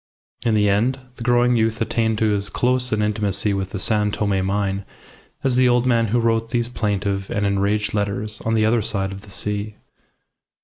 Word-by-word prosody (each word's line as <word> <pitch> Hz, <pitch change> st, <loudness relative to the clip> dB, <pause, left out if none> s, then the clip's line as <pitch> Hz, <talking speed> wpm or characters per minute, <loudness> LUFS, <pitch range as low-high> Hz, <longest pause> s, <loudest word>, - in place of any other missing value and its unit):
In 115 Hz, -2 st, +2 dB
the 105 Hz, -1 st, +3 dB
end, 115 Hz, +7 st, +1 dB, 0.2 s
the -, -, -13 dB
growing 120 Hz, 0 st, +3 dB
youth 115 Hz, 0 st, +1 dB
attained 110 Hz, 0 st, 0 dB
to 110 Hz, -1 st, +2 dB
as 100 Hz, 0 st, -1 dB
close 125 Hz, 0 st, +2 dB
an 105 Hz, -1 st, +1 dB
intimacy 105 Hz, -1 st, 0 dB
with 95 Hz, -1 st, -2 dB
the 100 Hz, -, -5 dB
San 105 Hz, +2 st, +2 dB
Tome 100 Hz, -2 st, 0 dB
mine 100 Hz, 0 st, -1 dB, 0.6 s
as 130 Hz, -2 st, +1 dB
the 130 Hz, -1 st, +5 dB
old 120 Hz, 0 st, +2 dB
man 115 Hz, -2 st, +2 dB
who 120 Hz, +4 st, +1 dB
wrote 115 Hz, -1 st, +1 dB
these 120 Hz, 0 st, -1 dB
plaintive 100 Hz, -4 st, -2 dB
and 105 Hz, 0 st, -1 dB
enraged 100 Hz, +1 st, 0 dB
letters 105 Hz, +1 st, -2 dB
on 115 Hz, 0 st, 0 dB
the 110 Hz, -1 st, +3 dB
other 115 Hz, +1 st, +2 dB
side 100 Hz, -2 st, -1 dB
of 95 Hz, 0 st, -8 dB
the 105 Hz, -, -16 dB
sea. 105 Hz, +1 st, -4 dB
105 Hz, 195 wpm, -21 LUFS, 100-115 Hz, 0.6 s, the